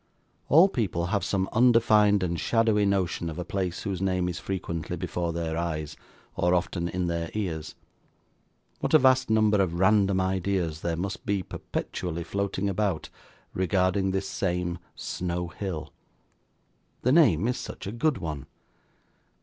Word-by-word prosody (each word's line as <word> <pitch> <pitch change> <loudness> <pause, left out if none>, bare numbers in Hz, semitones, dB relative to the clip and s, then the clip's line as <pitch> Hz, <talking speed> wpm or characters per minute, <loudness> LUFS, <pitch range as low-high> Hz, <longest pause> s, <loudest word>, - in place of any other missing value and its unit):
All 165 +6 +7
people 100 - -1
have 100 - +1
some 95 -1 0
undefined 110 -4 +5
and 85 -2 -1
shadowy 110 -3 +2
notion 90 -3 0
of 80 - -7
a 90 - -4
place 90 -1 -3
whose 95 -4 -3
name 90 -2 +1
is 90 -1 -3
frequently 85 -4 -4
before 85 -1 -2
their 80 -1 -3
eyes, 80 -2 -3 0.4
or 90 +1 +2
often 85 0 -1
in 90 0 -2
their 85 -1 -2
ears. 80 -7 -3 1.0
What - - +1
a - - +11
vast 130 -1 +4
number 110 -2 +4
of 90 -3 0
random 95 +1 +3
ideas 95 -4 -1
there 85 -1 -1
must 95 +3 -4
be 100 -2 -1
perpetually 85 0 -4
floating 100 +2 -2
about, 100 -4 -1 0.4
regarding 95 +1 +1
this 95 +1 -1
same 90 -2 -2 0.2
Snow 90 -1 -3
Hill. 90 -5 -5 1.1
The 125 - +3
name 115 - +5
is 125 - 0
such - - -7
a 100 - -4
good 140 +5 +1
one. 75 -6 -5
95 Hz, 150 wpm, -27 LUFS, 85-100 Hz, 1.1 s, a